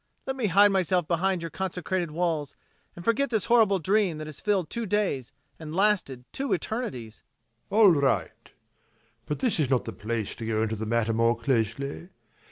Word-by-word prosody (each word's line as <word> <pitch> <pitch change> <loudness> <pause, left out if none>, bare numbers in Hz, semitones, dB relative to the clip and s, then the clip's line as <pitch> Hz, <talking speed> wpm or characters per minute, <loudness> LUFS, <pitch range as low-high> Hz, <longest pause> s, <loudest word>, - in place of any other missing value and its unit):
Let 265 - -2
me 250 -5 0
hide 200 +3 +6
myself 185 -3 +1
behind 180 +1 0
your 165 - -5
consecrated 185 -2 -2
walls 160 -3 -2 0.4
and 175 - -10
forget 255 +5 +2
this 220 -4 0
horrible 225 -5 +4
dream 190 -1 +1
that 155 - -6
has 155 -2 -8
filled 200 -5 0
two 235 -2 -3
days 185 - -1 0.3
and 160 0 -7
lasted 185 -11 +1
two 275 0 -2
eternities. 130 - -5 0.5
ABBÉ. - - -2
All 215 -4 +8
right! 140 -4 0 0.8
But 150 - -2
this 240 -9 +1
is 145 -5 +1
not 130 -3 +1
the 115 - -5
place 110 +2 -3
to 115 - -6
go 110 -1 +1
into 110 0 -1
the 110 +1 -5
matter 115 0 +1
more 115 +1 +2
closely. 130 - -2
170 Hz, 180 wpm, -27 LUFS, 125-200 Hz, 0.8 s, All